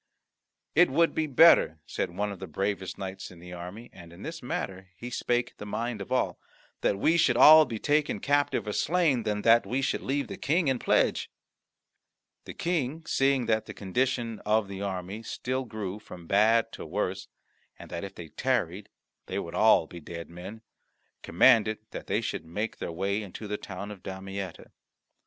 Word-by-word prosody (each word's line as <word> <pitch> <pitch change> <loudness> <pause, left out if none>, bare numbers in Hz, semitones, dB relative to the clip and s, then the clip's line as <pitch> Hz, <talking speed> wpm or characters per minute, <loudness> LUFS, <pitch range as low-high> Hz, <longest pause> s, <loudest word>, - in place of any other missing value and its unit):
"It 175 +3 +5
would 165 +5 +3
be 160 -1 0
better," 135 - +6
said - - -2
one 100 +4 -2
of 100 - -8
the 95 - -6
bravest 95 +3 -3
knights 95 0 -6
in 90 - -14
the 90 +1 -11
army, 90 +7 -8
and 85 -2 -13
in 85 +4 -12
this 165 0 -6
matter 95 -6 -4
he 120 +5 -7
spake 120 0 -1
the - - -8
mind 115 +1 -3
of 100 - -8
all, 130 - 0 0.4
"that 100 - +1
we 160 +11 +3
should 120 -7 +3
all 155 +3 +9
be 115 -5 -5
taken 150 +5 +1
captive 145 -2 +1
or 105 - -3
slain, 160 - +2
than 105 -1 -2
that 115 0 +6
we 135 +2 -1
should - - 0
leave 140 +1 -1
the - - -7
King 160 +1 +1
in 130 -2 0
pledge." - - +1 1.2
The - - -8
King, 160 -2 -2
seeing 135 -4 +2
that 110 -1 0
the - - -8
condition 115 +2 -1
of 105 0 +1
the 100 0 -7
army 95 +1 -4
still 130 +3 -3
grew 105 -3 -5
from 90 -5 -12
bad 110 +5 +3
to - - -8
worse, 95 +3 -3 0.5
and - - -12
that 85 - -4
if 100 -1 -7
they 85 -2 -9
tarried 105 -7 -1 0.4
they - - -3
would 85 - -4
all 110 -2 +5
be 85 - -10
dead 85 +1 -8
men, 95 +6 -9 0.6
commanded 110 +3 +4
that - - -7
they - - 0
should - - -3
make 105 +7 -4
their - - -4
way 100 +5 -1
into 105 +1 -8
the 105 - -2
town 100 +1 -7
of 100 -3 -10
Damietta. 95 -1 -7
105 Hz, 190 wpm, -28 LUFS, 95-130 Hz, 1.2 s, all